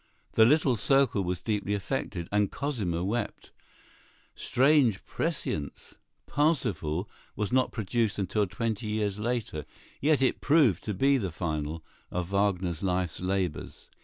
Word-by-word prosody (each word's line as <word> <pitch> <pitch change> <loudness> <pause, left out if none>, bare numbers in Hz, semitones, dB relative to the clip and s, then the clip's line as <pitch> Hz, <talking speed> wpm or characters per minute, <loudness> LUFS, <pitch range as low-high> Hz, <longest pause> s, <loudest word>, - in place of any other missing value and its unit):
The 110 - +6
little 135 -1 +4
circle 135 -3 +3
was 90 0 -2
deeply 105 -1 -1
affected, 85 -3 -3
and 105 -1 +2
Cosima 105 - -2
wept. 115 +6 -3 0.8
Strange 130 -5 +3
prescience! 130 - -3 0.3
"Parsifal" 105 - 0 0.3
was 105 -2 -2
not 130 0 +2
produced 110 0 -1
until 100 +1 0
twenty 110 +2 -3
years 105 -1 -1
later, 110 -9 -2 0.4
yet 150 +1 +3
it 130 - +1
proved 140 - +4
to 105 - -2
be 135 +6 +3
the 95 -5 -2
finale 80 -2 -3 0.3
of 90 +1 -3
Wagner's 95 -4 0
life's 90 -3 -1
labors. 90 -4 -3
105 Hz, 130 wpm, -28 LUFS, 90-125 Hz, 0.8 s, The